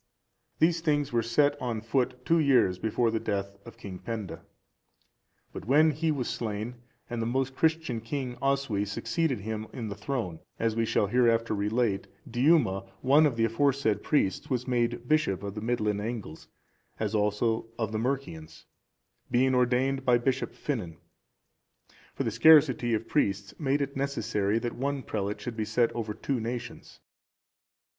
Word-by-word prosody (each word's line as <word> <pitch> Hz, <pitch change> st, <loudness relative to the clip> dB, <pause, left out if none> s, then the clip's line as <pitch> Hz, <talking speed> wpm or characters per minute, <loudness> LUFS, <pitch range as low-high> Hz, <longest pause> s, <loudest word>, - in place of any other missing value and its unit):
These 165 Hz, +1 st, +3 dB
things 145 Hz, -4 st, 0 dB
were 120 Hz, -, +3 dB
set 145 Hz, +5 st, +2 dB
on 120 Hz, -3 st, -2 dB
foot 125 Hz, +3 st, -1 dB
two 165 Hz, 0 st, +3 dB
years 130 Hz, -, +3 dB
before 110 Hz, +3 st, +1 dB
the 110 Hz, -, 0 dB
death 100 Hz, -2 st, -3 dB
of -, -, -11 dB
King 95 Hz, -3 st, -8 dB
Penda. 105 Hz, 0 st, -6 dB, 1.1 s
But -, -, -7 dB
when 150 Hz, +6 st, +5 dB
he 155 Hz, +3 st, -1 dB
was 135 Hz, -5 st, -2 dB
slain, 110 Hz, +2 st, -4 dB, 0.3 s
and 120 Hz, -1 st, -3 dB
the 115 Hz, -, -1 dB
most 130 Hz, +2 st, -1 dB
Christian 160 Hz, -7 st, 0 dB
king, 125 Hz, +1 st, -4 dB
Oswy, 135 Hz, -7 st, +1 dB
succeeded 115 Hz, +4 st, -1 dB
him 110 Hz, +1 st, -4 dB
in 115 Hz, -3 st, -5 dB
the 100 Hz, -, -5 dB
throne, 105 Hz, -, -3 dB, 0.2 s
as 115 Hz, -1 st, 0 dB
we 115 Hz, 0 st, +1 dB
shall 105 Hz, -, +2 dB
hereafter 115 Hz, 0 st, +2 dB
relate, 105 Hz, 0 st, 0 dB, 0.2 s
Diuma,(409) 120 Hz, -, +2 dB
one 145 Hz, +4 st, +5 dB
of 135 Hz, -, -2 dB
the 115 Hz, -, +3 dB
aforesaid 125 Hz, -1 st, +1 dB
four -, -, -19 dB
priests, 95 Hz, -11 st, +1 dB
was 125 Hz, -1 st, -1 dB
made 120 Hz, -1 st, 0 dB
bishop 120 Hz, -11 st, +1 dB
of 100 Hz, -1 st, -4 dB
the 105 Hz, -, -6 dB
Midland 105 Hz, -3 st, 0 dB
Angles, 105 Hz, -8 st, -6 dB, 0.5 s
as 110 Hz, -1 st, -1 dB
also 110 Hz, +2 st, +1 dB
of 110 Hz, -3 st, -2 dB
the 110 Hz, -, -2 dB
Mercians, 110 Hz, -, -4 dB, 0.6 s
being 130 Hz, +2 st, +3 dB
ordained 130 Hz, +2 st, +2 dB
by 125 Hz, -2 st, +4 dB
Bishop 130 Hz, +2 st, -1 dB
Finan; 90 Hz, -, -4 dB, 1.2 s
for -, -, -1 dB
the -, -, -1 dB
scarcity 140 Hz, -7 st, +5 dB
of 110 Hz, +1 st, -4 dB
priests 100 Hz, -8 st, 0 dB
made 140 Hz, -1 st, +1 dB
it 140 Hz, 0 st, -6 dB
necessary 115 Hz, -6 st, 0 dB
that 120 Hz, +1 st, -2 dB
one 140 Hz, +1 st, -2 dB
prelate 105 Hz, -1 st, -3 dB
should 120 Hz, -3 st, -6 dB
be 110 Hz, -, -1 dB
set 120 Hz, +2 st, +1 dB
over 110 Hz, -3 st, -4 dB
two 130 Hz, +3 st, -2 dB
nations. 120 Hz, +1 st, -6 dB
120 Hz, 165 wpm, -28 LUFS, 105-135 Hz, 1.2 s, when